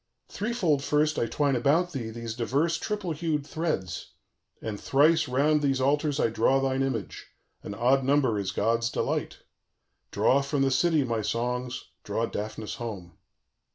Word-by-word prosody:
_ - - -22
"Threefold 195 - 0
first 150 +1 +1
I 115 - +1
twine 140 +3 +1
about 155 +9 +2
thee 125 -7 -4
these 115 0 -5
diverse 140 +8 0
triple 205 -5 -3
hued 155 -2 -1
threads, 150 - -3 0.5
and 105 -2 -5
thrice 155 +3 +3
round 145 +4 +2
these 135 -2 +1
altars 145 +2 +1
I - - +3
draw 115 +4 +2
thine 135 0 0
image: 130 -6 -3 0.3
an 100 - -7
odd 130 +5 +3
number 130 -5 +2
is 100 -1 -2
god's 115 +2 +1
delight. - - -2 0.7
"_Draw 140 +2 +3
from 140 0 0
the 135 - +2
city, 160 +1 +3
my 115 -3 -1
songs, 125 +3 -3
draw - - -1
Daphnis 110 +1 -5
home. 95 -8 -7
135 Hz, 155 wpm, -27 LUFS, 115-150 Hz, 0.7 s, thrice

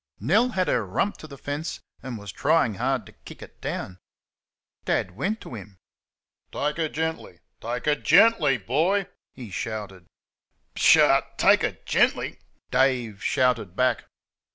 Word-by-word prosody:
Nell 205 - +3
had 185 -6 -1
her 120 - +1
rump 100 - -1
to 155 - -11
the 140 -2 -11
fence 145 +4 -5 0.2
and 130 -3 -6
was 100 -2 -8
trying 125 -3 +2
hard 125 +1 -1
to - - -14
kick - - -13
it - - -16
down. 95 -1 -5 0.9
Dad 95 - 0
went 190 - -2
to - - -10
him. 100 -3 -10 0.7
"Take 150 +2 -2
her 160 -2 -1
gently; 160 +1 -4 0.2
take 120 +2 -4
her 150 - +4
GENTLY, 150 - +4
boy," 175 - +1 0.3
he 120 -6 -9
shouted. 95 -3 -6 0.7
"PSHAW! - - +6 0.2
take - - +5
her - - -2
GENTLY!" - - +1 0.3
Dave 125 -6 +1
shouted 125 -9 +1
back. 130 +3 +1
130 Hz, 145 wpm, -25 LUFS, 110-155 Hz, 0.9 s, PSHAW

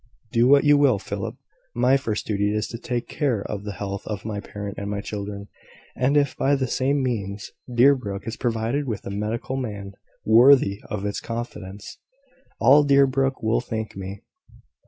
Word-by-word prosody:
"Do 120 +1 +3
what 140 +1 +6
you 145 -1 +5
will, 135 -7 +4
Philip. - - -5 0.4
My 125 +3 +4
first 115 -6 -2
duty 105 -1 0
is 105 0 -1
to 115 - -7
take 120 -1 -3
care 130 -9 -1
of 100 -1 -5
the 105 -1 -5
health 100 -1 -5
of 105 -2 -5
my 105 -2 -3
parent 105 0 -7
and 100 0 -4
my 100 -1 -2
children; 100 -1 -6 0.5
and 135 +3 +2
if, 140 -2 +2
by 140 +1 +2
the 135 -1 0
same 135 +3 0
means, 100 -5 -3 0.2
Deerbrook 120 -5 +2
is 115 - -3
provided 120 +4 -1
with 110 -4 -4
a - - -5
medical 110 +6 -3
man 105 -6 -5 0.3
worthy 115 -3 +6
of 105 -1 -4
its 100 - -2
confidence, 105 -4 -7 0.6
all 140 +5 +6
Deerbrook 135 -2 +2
will 110 +2 +2
thank 110 -3 -5
me." 95 +1 -7
115 Hz, 175 wpm, -24 LUFS, 100-130 Hz, 0.6 s, what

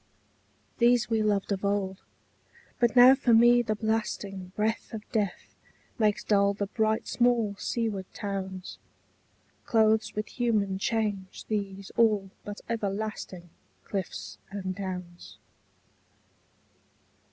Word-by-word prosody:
These 240 -1 +4
we 220 -1 +2
loved 205 -2 0
of 195 0 -1
old: 200 -1 -1 0.8
but 240 +1 +2
now 250 +1 +9
for 245 -3 +3
me 240 +1 +6
the 215 -2 -1
blasting 205 -4 -2
Breath 215 +1 -1
of 215 - -6
death 205 -5 -2 0.5
makes 210 -2 +2
dull 200 -1 +3
the 200 - -1
bright 220 +1 0
small 240 -4 +2
seaward 215 -5 -2
towns, 190 -2 -5 0.8
Clothes 220 -1 +2
with 210 0 -1
human 210 -6 0
change 205 -3 -2
these 200 -2 -3
all 210 -4 +3
but 205 0 -7
everlasting 200 -5 -4 0.3
Cliffs 105 - -5
and 190 -2 -4
downs. 180 -2 -7
210 Hz, 110 wpm, -28 LUFS, 195-225 Hz, 0.8 s, now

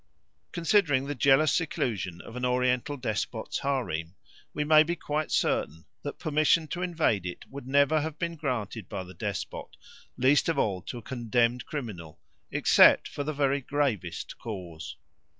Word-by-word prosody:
Considering 165 -7 +2
the 145 - -3
jealous 140 +3 +4
seclusion 105 - -2
of 115 - -11
an 125 - -5
oriental 125 +2 +1
despot's 110 -2 -3
harem 100 - -2 0.4
we 150 - -2
may 155 +1 +7
be 170 +2 0
quite 155 -1 -2
certain 80 +1 0 0.2
that 145 - -6
permission 155 +1 +2
to 175 +3 -4
invade 160 - +1
it 90 -1 -6
would 140 -1 -8
never 140 +3 +3
have 155 0 -4
been 170 0 -3
granted 115 - -3
by 95 - -4
the 90 0 -12
despot, 100 +1 -5 0.4
least 135 +6 +4
of 165 - 0
all 95 -4 0
to 120 - -7
a 120 - -9
condemned 120 -1 0
criminal, 100 - -6 0.3
except - - +6
for 145 - -5
the 150 - -2
very 140 -1 +1
gravest 125 - -2
cause. 90 -8 -7
130 Hz, 155 wpm, -28 LUFS, 105-150 Hz, 0.4 s, may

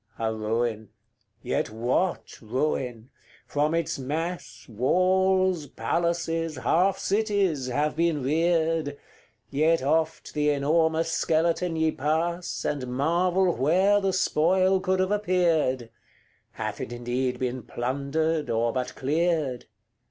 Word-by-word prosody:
CXLIII. 115 - -1
A 110 - -1
ruin 110 0 -2 0.5
yet - - -1
what 120 - -2
ruin! 125 0 -2 0.3
from 150 +2 0
its 170 -4 -1
mass 165 +7 -4
Walls, 185 - +2
palaces, 165 +1 -1
half 185 +8 +2
cities, 200 - 0
have 145 +4 0
been 165 -4 +1
reared; 160 0 +1 0.5
Yet 155 +1 +2
oft 160 +3 0
the 150 0 +1
enormous 160 +3 +1
skeleton 165 +1 +1
ye 160 0 +2
pass, 165 +5 -2
And 140 -4 -2
marvel 175 +7 +1
where 185 +9 +3
the 195 -1 +1
spoil 185 +2 +2
could 185 0 0
have 185 +1 +1
appeared. 170 - +1 0.6
Hath - - -4
it - - -5
indeed 125 +1 -2
been 125 0 -3
plundered, 140 +7 -2
or 115 0 +1
but 125 -1 -3
cleared? 150 -3 0
160 Hz, 115 wpm, -26 LUFS, 130-175 Hz, 0.6 s, where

